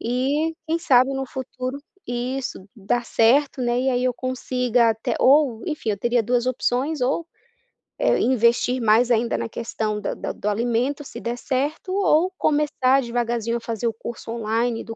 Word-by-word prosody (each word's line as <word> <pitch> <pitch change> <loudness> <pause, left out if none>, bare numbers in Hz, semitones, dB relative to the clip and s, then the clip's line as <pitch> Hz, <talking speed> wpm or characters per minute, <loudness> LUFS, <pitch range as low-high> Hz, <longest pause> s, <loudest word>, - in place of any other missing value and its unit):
e 275 +7 0
quem 325 +1 0
sabe 260 -3 +4
no 270 0 -2
futuro 255 +1 -5 0.3
isso 245 -2 -3
dá 225 +4 -1
certo, 255 +4 +2
né, 240 0 +1
e 265 - 0
aí 250 -1 +1
eu 255 - +2
consiga 250 -2 +1
até 225 +2 -2
ou, 270 -4 +4
enfim, 300 -9 -2
eu 205 - -1
teria 240 +2 +1
2 240 +2 +1
opções 255 +4 0
ou, 275 +6 0 0.7
eh, - - +3
investir 245 +1 +2
mais 230 +2 +4
ainda 235 +1 +2
na - - -4
questão 215 -2 -3
da 205 - -3
da - - -5
do 210 - -6
alimento 240 +6 0
se - - -9
der 235 +1 -3
certo 285 +8 -2
ou 370 -2 +3
começar 285 -3 +2
devagarzinho 235 -1 -1
a - - -6
fazer 230 0 -4
o 225 - -1
curso 230 0 -7
online 230 +1 -1
do 225 - -7
245 Hz, 175 wpm, -23 LUFS, 230-270 Hz, 0.7 s, sabe